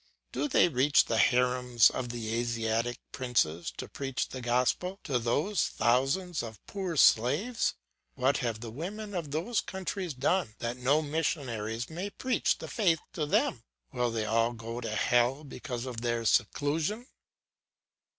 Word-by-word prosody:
Do - - -1
they 260 - +5
reach 140 -1 +4
the 115 - 0
harems 125 0 +4
of 125 - -4
the 115 -2 -4
Asiatic 115 0 -1
princes 85 -11 0
to - - -5
preach 135 -2 -3
the 130 - -6
gospel 125 +11 0
to 135 -6 0
those 145 - +1
thousands 135 +10 +1
of 110 -4 -8
poor 190 -4 -4
slaves? 145 - +3 0.4
What 130 +2 +2
have 115 -5 -2
the 115 -2 -6
women 205 - -6
of 170 -5 -3
those 170 +11 0
countries 190 -4 -4
done 140 - 0
that 120 +1 -3
no 140 +5 +2
missionary 130 -8 -2
may 180 +5 -5
preach 255 +5 0
the - - -7
faith 175 -8 +2
to 155 -5 -2
them? - - +1 0.3
Will 125 -1 0
they 115 -2 -2
all 115 +2 +2
go 115 +1 -6
to 115 - -4
hell 120 +6 +2
because 130 -3 -6
of 120 -3 -5
their 120 -1 -1
seclusion? 160 - +1
125 Hz, 150 wpm, -30 LUFS, 115-165 Hz, 0.4 s, they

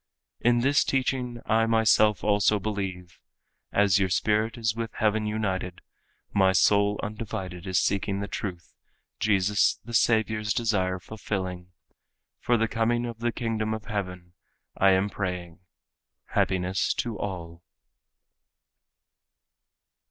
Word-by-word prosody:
In 120 0 +3
this 140 +3 +3
teaching 130 -2 -1
I 115 0 +2
myself 110 -2 +3
also 105 0 +3
believe—As 95 0 -2
your 95 -1 +1
spirit 110 +4 +1
is 110 -2 0
with 115 -1 -5
heaven 110 0 +1
united, 95 -4 -2 0.5
My 95 -1 +4
soul 100 +2 +3
undivided 100 -4 -5
is 95 -1 0
seeking 100 +1 0
the 100 - -3
truth 90 -5 -6 0.5
Jesus 100 -1 +2
the 120 - -8
Savior's 110 -2 +2
desire 95 -5 0
fulfilling, 90 -1 -5 0.7
For 120 - +2
the 115 0 +1
coming 120 +2 0
of 115 -2 -6
the 120 0 0
Kingdom 110 -2 -2
of 110 0 -9
Heaven 90 -4 -5 0.4
I 95 - +4
am 95 +2 +2
praying. 90 -4 -5 0.7
Happiness 95 +1 0
to 115 -5 -3
all." 85 -4 -6
105 Hz, 115 wpm, -26 LUFS, 95-110 Hz, 0.7 s, My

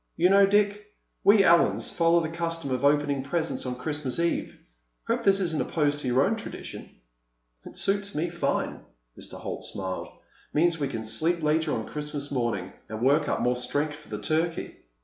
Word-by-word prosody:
"You 180 +3 +4
know, 200 0 +6
Dick, 205 +1 +1 0.3
we 200 0 +6
Allens 170 -2 +4
follow 170 0 +3
the 160 - -3
custom 165 -4 -3
of 130 +1 -1
opening 145 -1 +2
presents 160 0 -2
on 125 - -2
Christmas 145 0 -2
Eve. 170 0 -1 0.5
Hope - - -1
this 195 0 +4
isn't 165 -5 0
opposed 145 -2 0
to 140 - -5
your 125 +2 +3
own 220 +6 +1
tradition." 225 - -8 0.8
"It - - -10
suits 200 0 0
me 165 +3 -1
fine." 170 -5 -1 0.4
Mr. - - -8
Holt - - -5
smiled. 95 -1 -4 0.5
"Means 165 +1 +3
we 140 - 0
can 115 -5 -4
sleep 155 +10 0
later 155 +1 +2
on 110 - -3
Christmas 150 -1 -5
morning—and 110 -4 -3
work 145 +3 +3
up - - 0
more 125 0 +2
strength 145 +5 -1
for - - -17
the 105 - -4
turkey." 160 +5 -1
155 Hz, 175 wpm, -27 LUFS, 135-170 Hz, 0.8 s, know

